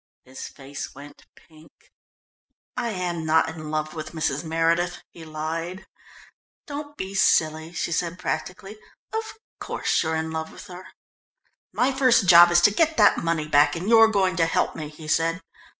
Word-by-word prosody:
His 130 +1 -9
face 135 0 -9
went 145 +1 -14
pink. 155 0 -20 1.0
"I 245 -2 -2
am 180 -5 -3
not 160 +1 +2
in 155 -1 -8
love 155 0 -3
with 155 -1 -7
Mrs. 150 -2 -2
Meredith," 165 +2 0
he 165 - -12
lied. 160 +4 -5 0.8
"Don't 290 0 -8
be 190 +1 -5
silly," 160 -4 +2
she 170 - -3
said 170 +1 -2
practically, 185 +4 -5 0.3
"of 445 0 -4 0.2
course - - -1
you're 160 0 -1
in 160 0 -3
love 160 0 -5
with - - -12
her." 185 -1 -11 0.8
"My 265 +2 +1
first 255 -6 +3
job 175 0 +9
is 175 0 +4
to 210 - +5
get 320 +8 +1
that 210 -2 +5
money 165 -2 -1
back, 145 +1 +3
and 175 +4 -5
you're 225 0 +7
going 195 -4 +1
to 165 -1 +2
help - - 0
me," 155 -2 -6
he 155 +1 -12
said. 165 +3 +1
165 Hz, 165 wpm, -24 LUFS, 155-190 Hz, 1.0 s, job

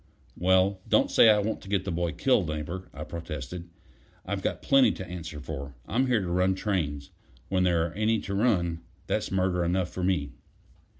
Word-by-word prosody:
"Well, 95 +2 +2
don't - - +3
say 115 - +7
I 105 - +6
want 105 +2 -1
to 95 - -11
get 100 -2 0
the 95 - -2
boy 85 -1 -1
killed, 125 - +2
Neighbor," 80 +4 -5
I - - -7
protested. 85 +1 -6 0.6
"I've - - -3
got - - -2
plenty 135 -5 +5
to 95 - -7
answer 85 -4 -7
for. 70 -2 -7
I'm 130 +6 +1
here 120 -4 +2
to 90 -2 -3
run 90 +1 +2
trains 75 -9 -2 0.4
when 95 -1 +1
there 85 -2 +2
are 85 - -10
any 110 +2 +1
to 100 - -5
run; 90 -6 +1 0.2
that's - - -1
murder 90 -2 +1
enough 90 +1 0
for 90 - -4
me. 85 -6 0
90 Hz, 190 wpm, -28 LUFS, 85-100 Hz, 0.6 s, say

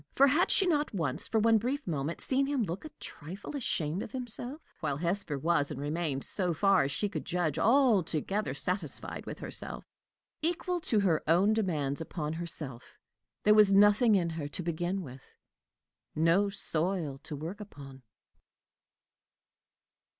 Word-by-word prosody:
For 275 - +7
had 295 +6 +3
she 390 - +5
not 300 - +1
once, 160 -8 -2
for 225 - 0
one 225 0 +4
brief 265 +6 -2
moment, 155 -1 -2
seen 275 +1 +1
him 280 -4 0
look 185 - -4
a - - -6
trifle 185 - -8
ashamed 170 - -1
of - - -7
himself? 250 +3 -2 0.2
while 145 -4 -1
Hesper 170 -2 -1
was 145 0 +1
and - - -5
remained, 145 -1 -2
so 180 -4 -1
far 195 +3 +4
as 135 +1 0
she 205 - 0
could - - -5
judge, 175 -4 -1
altogether 210 - +2
satisfied 155 +3 -3
with - - -5
herself. - - -5 0.6
Equal 350 +2 -1
to 220 -9 +1
her 175 -6 +2
own 185 +7 +4
demands 155 -10 -1
upon 155 -2 -4
herself, 155 -7 -6 0.5
there 210 - +6
was 210 -2 +6
nothing 205 +2 +6
in 170 -3 +1
her 160 -3 -4
to 175 - -5
begin 175 +3 -2
with 130 -3 -10 0.9
no 170 +6 +3
soil 165 -6 -1
to 150 - -7
work 165 +8 -6
upon. 140 -10 -11
180 Hz, 155 wpm, -30 LUFS, 155-215 Hz, 0.9 s, For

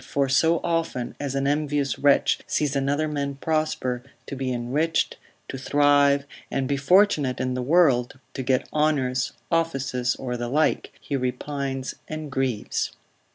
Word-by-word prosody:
for 140 -1 0
so 165 +5 +3
often 165 -8 -1
as 140 -2 -3
an 135 0 0
envious 145 -1 0
wretch 140 -1 +3
sees 145 -2 0
another 140 +3 +1
man 140 -2 -2
prosper, 155 -5 -1 0.2
to - - -6
be 130 -1 -2
enriched, 135 +7 0 0.3
to 135 - -6
thrive, 145 0 +3 0.2
and 135 -1 -1
be 140 - +1
fortunate 150 -2 +3
in 130 0 -1
the 125 - -2
world, 135 -4 +3 0.2
to 135 - -4
get 130 0 +1
honours, 135 -4 +1 0.2
offices, 135 -7 0
or 125 -2 -4
the 120 0 -3
like, 155 +4 +1
he 145 - -4
repines 135 +1 -3
and 155 -2 -6
grieves. 130 -5 -1
140 Hz, 150 wpm, -25 LUFS, 130-150 Hz, 0.3 s, so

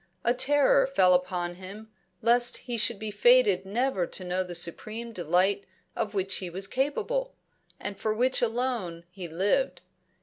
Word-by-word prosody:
A 240 - +3
terror 270 +1 +3
fell 190 -9 +4
upon 180 -1 -1
him 210 +4 -10 0.3
lest 240 +1 +4
he 245 -2 -5
should 230 0 +2
be 215 +1 -5
fated 485 - +4
never 215 -4 -1
to 185 - -2
know 180 +1 -1
the 180 -1 -8
supreme 215 +7 -2
delight 185 +3 +1 0.3
of 220 -3 -3
which 190 -1 +1
he 185 - -5
was 190 +3 -3
capable, 390 - -2 0.4
and 205 - -5
for 220 - -1
which 250 +4 +1
alone 230 -8 -2
he 180 -1 -7
lived. 190 - 0
215 Hz, 160 wpm, -27 LUFS, 185-250 Hz, 0.4 s, fell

